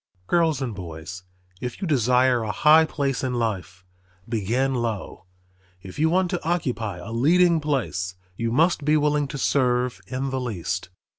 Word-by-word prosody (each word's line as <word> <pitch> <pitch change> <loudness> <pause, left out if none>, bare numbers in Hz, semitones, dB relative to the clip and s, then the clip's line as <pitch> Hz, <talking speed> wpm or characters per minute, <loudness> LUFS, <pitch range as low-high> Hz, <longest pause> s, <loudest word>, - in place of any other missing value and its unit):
Girls 160 - +2
and 120 -4 -3
boys, 90 0 -8 0.3
if 125 -1 -5
you 190 - -3
desire 125 -3 +3
a 110 -2 -2
high 155 +7 +6
place 140 -4 -2
in 130 -1 -1
life, 95 -6 -3 0.4
begin 120 +4 0
low. 115 -6 -3 0.6
If 95 +5 -9
you 160 +1 +3
want 180 +1 +1
to 175 - -2
occupy 125 - -2
a 90 +6 -8
leading 165 +8 +4
place 110 -11 -2 0.2
you 115 +3 -2
must 160 +4 +2
be 150 +2 +3
willing 150 -1 +1
to 140 - -6
serve 125 -2 +1
in 130 +1 -3
the 130 -1 -2
least. 95 -6 -3
125 Hz, 160 wpm, -24 LUFS, 110-150 Hz, 0.6 s, high